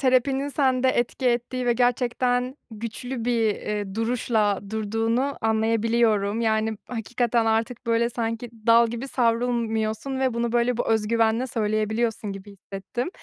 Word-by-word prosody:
terapinin 265 +1 +2
sende 260 -2 +2
etki 250 +1 0
ettiği 245 +1 0
ve 240 - +4
gerçekten 245 +1 +1
güçlü 230 +2 -5
bir, 240 -1 +1 0.2
eee, 205 -2 -4
duruşla 225 -3 +1
durduğunu 225 +5 -1
anlayabiliyorum. 225 -1 +1
Yani 220 -1 +1
hakikaten 235 0 0
artık, 225 +2 -1
böyle, 230 +1 +2
sanki 230 0 -3 0.2
dal 230 0 +6
gibi 235 +4 -5
savrulmuyorsun 235 +1 0
ve 260 -3 +1
bunu 235 0 -1
böyle 240 0 +2
bu - - -1
öz 220 -1 +1
güvenle 230 +2 +2
söyleyebiliyorsun 215 -1 -1
gibi 195 +1 -10
hissettim. 200 - -5
230 Hz, 130 wpm, -24 LUFS, 220-245 Hz, 0.2 s, dal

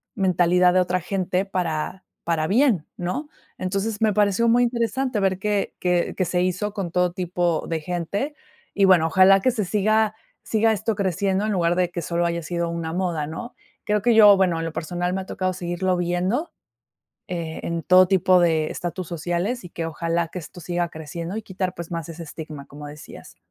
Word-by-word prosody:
mentalidad 180 -2 +3
de 185 - +4
otra 180 0 0
gente 185 +1 -1
para 180 -1 -3 0.2
para 165 -2 0
bien, 220 - +3
¿no? 185 - -3 0.3
Entonces, 200 +4 -2
me 220 -1 +4
pareció 205 +2 +2
muy 245 +1 +4
interesante 240 0 0
ver 190 -1 +1
que 205 0 -1
que 180 -1 +1
que 185 - +1
se 180 +1 0
hizo 185 +3 -1
con 195 -5 -4
todo 180 0 +1
tipo 175 -2 -1
de 165 -1 -1
gente. 180 - -3 0.4
Y, 200 - +1
bueno, 175 -4 +5
ojalá 190 +3 +6
que 255 - +3
se 225 -3 -1
siga 215 +2 +2 0.3
siga 220 0 +2
esto 215 +1 -1
creciendo, 195 +1 0
en 215 - 0
lugar 175 -2 +2
de 180 -1 +1
que 175 - -4
solo 170 +2 -1
haya 170 0 -1
sido 170 +1 -2
una 165 -1 -4
moda, 175 -5 -1
¿no? 240 +11 -7 0.3
Creo 210 0 +1
que 235 +2 +3
yo, 205 -3 +8
bueno, 180 -4 +2
en 165 - -3
lo 165 - -3
personal, 175 +2 -2
me 190 - -1
ha - - -8
tocado 185 0 -2
seguirlo 180 +1 -1
viendo, 180 - -1 0.8
eh, 170 -3 -4
en 170 -1 -2
todo 185 0 +6
tipo 185 -1 +4
de 160 -3 +2
estatus 175 0 -4
sociales, 175 +8 -2
y 180 - -8
que 165 -1 -4
ojalá 165 +1 -1
que 180 - -6
esto 170 +2 -12
siga 175 0 -2
creciendo 165 +4 -6
y 220 - -4
quitar, 185 -2 -3
pues, 170 -1 -7
más 165 -1 -4
ese 165 0 -7
estigma, 150 -2 -8
como 145 +1 -10
decías. 150 - -12
180 Hz, 195 wpm, -23 LUFS, 170-200 Hz, 0.8 s, yo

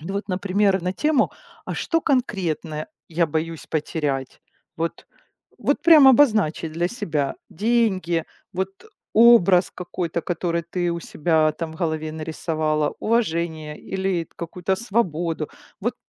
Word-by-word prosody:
ну 180 +6 -6
вот, 200 - -3
например, 195 +1 +1
на 180 +1 -1
тему: 300 +5 +2 0.3
а - - -4
что 330 -1 0
конкретно 180 - -1 0.2
я 170 +1 +1
боюсь 160 +1 -3
потерять? 145 -4 -2 0.4
Вот, 165 0 -3 0.5
вот - - 0
прям 310 -5 +8
обозначить 215 - +3
для 170 +2 0
себя. 160 - -2
Деньги, 190 -6 +1 0.3
вот 190 +1 -1 0.4
образ 210 -6 +6
какой-то, 175 -1 -3
который 170 -1 -1
ты 175 +1 -2
у 170 - -2
себя 155 -1 +1
там 160 +1 -5
в - - -11
голове 160 -2 -2
нарисовала, 155 -1 -1
уважение 165 -9 -1
или 190 -3 -2
какую-то 180 +2 -2
свободу. 175 -8 -1 0.3
Вот - - -1
170 Hz, 125 wpm, -23 LUFS, 160-195 Hz, 0.5 s, прям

